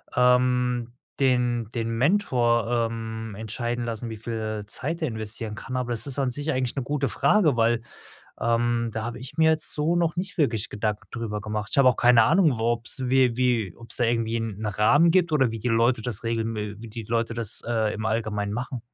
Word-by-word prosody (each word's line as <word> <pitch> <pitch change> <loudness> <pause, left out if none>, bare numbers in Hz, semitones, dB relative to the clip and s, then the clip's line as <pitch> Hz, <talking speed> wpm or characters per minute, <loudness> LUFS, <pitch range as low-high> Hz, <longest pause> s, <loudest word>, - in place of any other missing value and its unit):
ähm, 125 -1 +2 0.3
den 125 -4 +1
den 115 -1 -2
Mentor, 120 - +2
ähm, 110 -1 -6
entscheiden 120 +2 -3
lassen, 115 0 -4
wie 110 - -6
viel 110 -1 -4
Zeit 165 +10 -3
der 160 - +1
investieren 110 -1 -5
kann. 130 - -6
Aber 120 -1 -2
das 115 - 0
ist 140 0 -2
an 135 -2 +1
sich 145 +5 -2
eigentlich 130 -3 -1
'ne 135 - 0
gute 140 0 -1
Frage, 150 - +3
weil, 115 0 +2 0.6
ähm, 115 0 +1
da 110 0 -3
habe 120 +1 -5
ich 130 0 -10
mir 160 0 +5
jetzt 155 -1 -1
so 155 +3 +1
noch 170 -1 +1
nicht 190 +2 -4
wirklich 115 -8 +1
Gedanken 105 0 -3
drüber 110 -3 -4
gemacht. 105 -1 -3
Ich - - +1
habe 135 -2 +6
auch - - -3
keine 120 -1 +6
Ahnung, 150 - +3
wo 110 - -2
ob's 120 +3 -2
wie 125 -2 +3
wie 120 -7 +1
ob's 115 - -4
da 125 - +2
irgendwie 115 0 0
'n 110 -2 -5
Rahmen 110 +11 +4
gibt 170 -2 +2
oder 135 -6 +3
wie 115 - -5
die 125 - -2
Leute 115 +1 +2
das 110 -2 -4
regeln 115 0 -1
we 105 -1 -4
wie 115 +1 -9
die 110 +1 -7
Leute 115 +1 -1
das, 115 -3 0
äh, 110 -2 0
im 110 0 -3
Allgemein 105 -2 -1
machen. 125 +1 -4
120 Hz, 210 wpm, -25 LUFS, 110-130 Hz, 0.6 s, habe